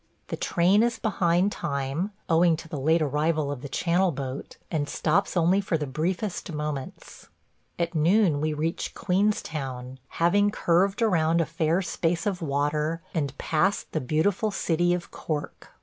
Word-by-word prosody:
The -, -, -2 dB
train 185 Hz, +5 st, +3 dB
is 235 Hz, 0 st, +1 dB
behind 185 Hz, -3 st, +1 dB
time, 140 Hz, +4 st, -2 dB, 0.2 s
owing 165 Hz, 0 st, +4 dB
to 165 Hz, -, -9 dB
the 155 Hz, -3 st, -5 dB
late 160 Hz, +4 st, +3 dB
arrival 150 Hz, +1 st, 0 dB
of 140 Hz, -4 st, -5 dB
the 140 Hz, -, -7 dB
Channel 175 Hz, +5 st, +1 dB
boat, 135 Hz, -2 st, -6 dB
and 150 Hz, -3 st, -1 dB
stops 175 Hz, +4 st, +1 dB
only 175 Hz, +4 st, +3 dB
for 180 Hz, -4 st, 0 dB
the 150 Hz, -, -3 dB
briefest 175 Hz, +7 st, -2 dB
moments. 150 Hz, -3 st, -6 dB, 0.5 s
At 170 Hz, 0 st, -1 dB
noon 165 Hz, -1 st, +3 dB
we 155 Hz, 0 st, 0 dB
reach 155 Hz, +3 st, -3 dB
Queenstown, 150 Hz, -10 st, -1 dB
having 205 Hz, +5 st, +2 dB
curved 195 Hz, +3 st, +2 dB
around 165 Hz, -5 st, +3 dB
a 165 Hz, -, +2 dB
fair 165 Hz, +3 st, 0 dB
space 165 Hz, 0 st, -1 dB
of 195 Hz, -3 st, -1 dB
water 150 Hz, +2 st, -1 dB
and 145 Hz, -4 st, -2 dB
past 180 Hz, +6 st, 0 dB
the 155 Hz, -, -1 dB
beautiful 180 Hz, -, +1 dB
city 175 Hz, -2 st, +1 dB
of 175 Hz, -, -7 dB
Cork. 150 Hz, -2 st, -5 dB
165 Hz, 155 wpm, -26 LUFS, 150-180 Hz, 0.5 s, owing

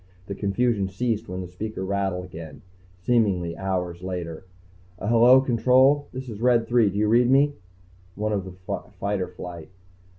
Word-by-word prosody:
The 100 Hz, -, -5 dB
confusion 100 Hz, +1 st, 0 dB
ceased 105 Hz, +3 st, -2 dB
when 90 Hz, 0 st, -4 dB
the 90 Hz, -, -6 dB
speaker 95 Hz, +2 st, -5 dB
rattled 95 Hz, -2 st, -2 dB
again, 80 Hz, -3 st, -10 dB, 0.3 s
seeming 90 Hz, -5 st, +1 dB
hours 90 Hz, -1 st, -3 dB
later. 90 Hz, -1 st, -5 dB, 0.5 s
"Uh, -, -, -7 dB
hello, 120 Hz, +3 st, +6 dB
Control, 130 Hz, +3 st, +3 dB
this 130 Hz, +1 st, -7 dB
is 110 Hz, -2 st, -8 dB
Red 120 Hz, -2 st, +3 dB
Three, 120 Hz, -4 st, +3 dB
do 100 Hz, -, -5 dB
you 105 Hz, +1 st, +2 dB
read 120 Hz, +3 st, +4 dB
me?" 140 Hz, +2 st, +4 dB, 0.6 s
One 105 Hz, +1 st, -2 dB
of 100 Hz, -2 st, -1 dB
the 90 Hz, 0 st, -6 dB, 0.2 s
fighter 100 Hz, -2 st, -1 dB
flight. 85 Hz, -2 st, -9 dB
100 Hz, 160 wpm, -24 LUFS, 90-120 Hz, 0.6 s, hello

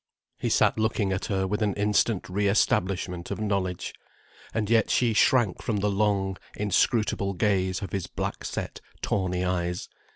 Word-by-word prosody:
He -, -, -1 dB
sat -, -, +3 dB
looking 110 Hz, -3 st, +1 dB
at 95 Hz, -, -2 dB
her 95 Hz, -2 st, 0 dB
with 105 Hz, +3 st, -2 dB
an 105 Hz, -2 st, +1 dB
instant 105 Hz, 0 st, +1 dB
re 100 Hz, +3 st, 0 dB
establishment 90 Hz, -3 st, +1 dB
of -, -, -4 dB
knowledge. 100 Hz, -4 st, -2 dB, 0.6 s
And 110 Hz, -2 st, -1 dB
yet 115 Hz, -1 st, +3 dB
she 120 Hz, -3 st, +2 dB
shrank 110 Hz, -2 st, +3 dB
from 110 Hz, -4 st, -1 dB
the 100 Hz, +1 st, +1 dB
long, 100 Hz, -2 st, +1 dB, 0.2 s
inscrutable 105 Hz, 0 st, +1 dB
gaze 95 Hz, -1 st, +1 dB
of 100 Hz, -, -6 dB
his 95 Hz, -3 st, -2 dB
black -, -, -4 dB
set, -, -, -5 dB, 0.2 s
tawny 90 Hz, -2 st, 0 dB
eyes. 90 Hz, -1 st, -2 dB
100 Hz, 160 wpm, -27 LUFS, 95-105 Hz, 0.6 s, sat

